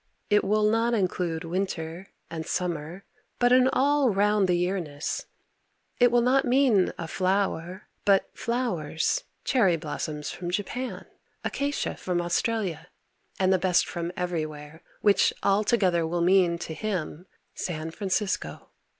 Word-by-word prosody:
It 210 - +5
will 210 +1 +2
not 230 +2 +2
include 180 -5 -1
winter 175 0 -3 0.2
and 160 -1 -4
summer 175 +1 -3 0.3
but 245 0 +4
an 255 0 +6
all 280 0 +3
round 205 -1 +2
the 180 - +4
year 180 +2 0
ness, 150 -2 -4 0.7
it 245 -1 +5
will 240 0 +4
not 265 +2 +3
mean 245 -7 +3
a 165 - -5
flower, 185 0 -1 0.2
but 195 -1 +3
flowers, 230 - -1 0.2
cherry 200 -10 +3
blossoms 150 -1 -4
from 175 -1 -5
Japan, 225 +7 -3 0.4
acacia 285 0 -2
from 180 -1 -2
Australia, 175 -1 -1 0.5
and 190 0 +3
the 185 - +2
best 180 -1 +2
from 170 0 -4
everywhere 155 -3 -4 0.2
which 205 -1 +4
all 200 +2 +3
together 185 -7 +2
will 170 +1 -1
mean 175 -1 +4
to 170 -1 -6
him 180 -1 -4 0.3
San 160 -2 -4
Francisco. 195 +2 -2
185 Hz, 135 wpm, -27 LUFS, 170-215 Hz, 0.7 s, an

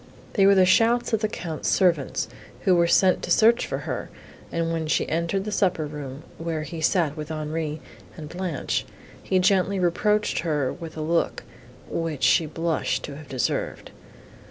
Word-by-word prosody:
They 195 -2 +5
were 200 - +6
the 190 -1 +6
shouts 230 +5 +3
of 220 - +3
the 215 - +2
Count's 165 -6 -4
servants, 170 -8 +2 0.3
who 185 - +3
were 170 -1 +4
sent 185 +2 +4
to - - -5
search 230 +2 +4
for - - -2
her; - - -4 0.4
and 165 0 -1
when 160 -1 -2
she - - +1
entered 170 +4 -1
the 210 - -4
supper 185 -6 +1
room, 145 -1 -7 0.2
where 165 -2 -3
he 165 0 -6
sat 160 -3 +2
with 150 0 -6
Henri 155 0 -3 0.4
and 155 - -7
Blanche, 175 -3 -2 0.4
he 190 - 0
gently 190 +1 +3
reproached 210 +4 +1
her 150 -6 0
with 165 -2 -9
a - - -3
look, 165 +2 0 0.4
which 165 -4 -3
she 160 - +4
blushed 165 +1 -1
to 140 - -6
have 150 -1 -12
deserved. 130 -3 -2
165 Hz, 175 wpm, -25 LUFS, 155-190 Hz, 0.4 s, were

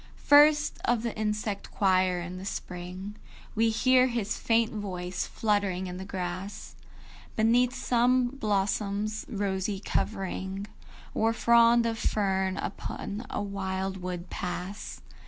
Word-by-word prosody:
I. - - -24
First 295 +1 +5
of 235 -1 +1
the 235 - -2
insect 210 -1 -2
choir, 185 -2 +2
in 175 +1 -6
the - - -8
spring 185 +1 -6 0.4
We 225 +1 +3
hear 255 +3 +4
his 230 -3 -1
faint 230 0 +1
voice 185 -4 -4
fluttering 200 -4 0
in 180 0 -5
the 190 - -6
grass, 185 +1 -5 0.6
Beneath 240 +3 +3
some 250 0 +2
blossom's 210 -2 -1
rosy 195 -2 -1
covering 195 -1 -2 0.5
Or 225 +1 +2
frond 235 0 +5
of 225 -1 -1
fern 190 -2 0
upon 205 +3 -5
a - - -2
wildwood 190 -2 -4
pass. 185 +2 -5
205 Hz, 120 wpm, -28 LUFS, 190-230 Hz, 0.6 s, First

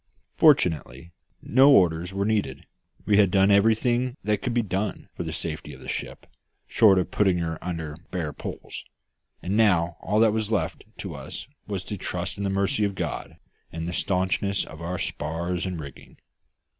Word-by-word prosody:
Fortunately, 80 -2 +3 0.3
no 130 +4 +6
orders 90 - +4
were 100 +1 -1
needed, 105 -11 -1 0.4
we 105 -1 +4
had 100 -2 +5
done 95 +2 +4
everything 120 +5 +3
that 105 -1 0
could 125 - -2
be 120 0 +1
done 95 0 -3
for - - -6
the - - -3
safety - - -5
of - - -12
the - - -11
ship - - -5 0.4
short 100 -4 +5
of 90 - 0
putting 95 -4 +2
her 80 -2 -3
under 80 -4 -4
bare 85 -5 -3
poles - - -7 0.6
and 95 - -1
now 90 -6 +3
all 105 +4 +1
that 110 -1 +5
was 110 -1 -1
left 95 -8 -1
to - - -6
us - - -7 0.2
was 100 -3 -3
to 105 - -5
trust 90 +1 -4
in - - -2
the 100 - 0
mercy 100 +2 +1
of 100 -1 0
God, - - -4 0.3
and 80 0 -4
the 90 - -3
staunchness 95 +2 0
of 80 +1 -11
our 90 +2 -3
spars 85 +5 -3
and 90 -3 -4
rigging. 70 -3 -11
95 Hz, 180 wpm, -25 LUFS, 85-105 Hz, 0.6 s, no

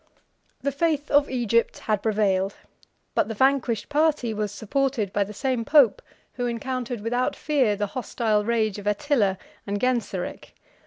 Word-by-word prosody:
] - - -42
The 280 - +1
faith 295 0 0
of 285 0 +4
Egypt 235 -2 +1
had 210 -2 -1
prevailed: 200 -3 +1 0.6
but - - +2
the 225 - -4
vanquished 260 -3 +2
party 295 -6 +1
was 210 -1 -2
supported 225 0 -1
by 205 - +2
the 200 - -8
same 250 +2 -1
pope 270 -4 +5 0.3
who 245 -1 -2
encountered 245 -1 -3
without 245 +3 0
fear 265 -9 +1
the 205 +1 -1
hostile 220 -4 0
rage 220 -2 0
of 205 - -7
Attila 210 -3 +1 0.3
and 200 0 -1
Genseric. 235 -7 -2
230 Hz, 155 wpm, -25 LUFS, 210-265 Hz, 0.6 s, pope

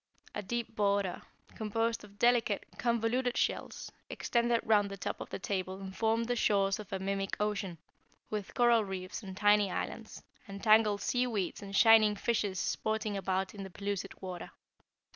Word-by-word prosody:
A 210 - -3
deep 235 +2 -4
border, 200 -2 +1 0.3
composed 225 +1 -1
of 205 -1 -15
delicate, 235 -3 +2
convoluted 240 +1 +1
shells, - - -2 0.2
extended 235 -1 +1
round 210 -2 +3
the 195 - -7
top - - -4
of - - -7
the - - -4
table 190 -1 -3
and 190 -1 -8
formed 225 +1 +1
the 245 - 0
shores 195 -4 +2
of 210 -1 -9
a 195 - -1
mimic 195 0 -2
ocean, 205 -4 -1 0.5
with 210 -2 -4
coral 240 -2 +5
reefs 190 0 -5
and 190 -3 -8
tiny 205 -1 +4
islands, - - -5 0.2
and 200 0 -8
tangled 215 -2 +5
sea 250 0 +1
weeds 205 -7 -2
and 195 -1 -7
shining 220 -1 +7
fishes 205 -3 -1
sporting 220 +1 -1
about 190 0 -1
in 205 - -8
the 190 - -6
pellucid 200 +1 -4
water. 180 -2 -6
205 Hz, 165 wpm, -32 LUFS, 195-225 Hz, 0.5 s, shining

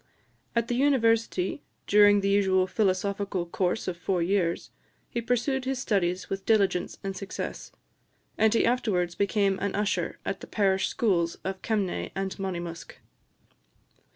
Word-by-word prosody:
At 235 0 +1
the 245 - -1
University, 230 -5 +2 0.2
during 205 0 +6
the 195 - 0
usual 190 -2 +3
philosophical 195 -1 -1
course 180 +1 -1
of 185 - -2
four 175 0 0
years, 175 -2 0 0.4
he 235 - -2
pursued 250 +3 0
his 265 0 -1
studies 190 -7 0
with 195 0 -4
diligence 200 -5 +1
and 195 0 -3
success; 195 +1 -6 0.6
and 220 0 +3
he 230 - +3
afterwards 200 -8 +1
became 200 +1 +1
an 200 - -2
usher 195 -4 -1
in - - -1
the - - -10
parish 195 -2 +1
schools 170 -7 +1
of 190 0 -4
Kemnay 205 -5 -1
and 195 0 -2
Monymusk. 175 -3 -5
195 Hz, 140 wpm, -27 LUFS, 185-220 Hz, 0.6 s, during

